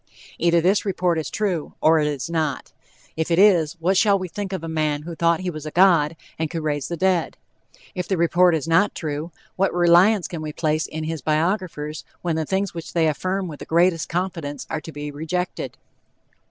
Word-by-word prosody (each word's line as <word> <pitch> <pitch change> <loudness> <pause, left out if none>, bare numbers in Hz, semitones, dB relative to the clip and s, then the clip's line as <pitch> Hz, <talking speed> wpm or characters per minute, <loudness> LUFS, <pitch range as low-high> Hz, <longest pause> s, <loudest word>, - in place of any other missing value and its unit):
Either 170 0 +3
this 190 +4 +2
report 180 -4 0
is 155 - -4
true, 185 -8 -2
or 160 0 +4
it 150 - +1
is 145 -1 -3
not. 160 -4 -2 0.4
If 160 +1 -2
it 165 - +2
is, 180 -6 +5
what 175 +3 0
shall 200 0 +4
we 185 -1 -4
think 195 +3 -5
of 185 -4 -4
a - - -4
man 155 -2 -1
who 170 +2 -6
thought 170 +1 +1
he 185 -1 -2
was 155 -1 -7
a - - -2
god 165 -3 +4 0.2
and 160 -1 -1
could 165 -1 -4
raise 145 -2 -1
the 170 - -4
dead? 185 -2 +1 0.6
If 180 -3 -4
the 190 - 0
report 170 +1 +4
is 160 0 -3
not 190 +6 +3
true, 155 +1 -4 0.3
what 195 +1 +2
reliance 175 +3 +4
can 165 -3 -6
we 155 -1 -5
place 155 0 0
in 160 0 -5
his 160 -1 -4
biographers 155 0 -1 0.2
when 170 -2 0
the 160 0 -1
things 195 0 -1
which 165 -2 -7
they 165 -2 +2
affirm 185 +5 -1
with 150 -4 -8
the - - -8
greatest 170 0 +2
confidence 170 -5 -3
are 160 - -2
to 160 - -9
be 145 -1 -6
rejected? 165 +5 -4
165 Hz, 210 wpm, -23 LUFS, 155-180 Hz, 0.6 s, is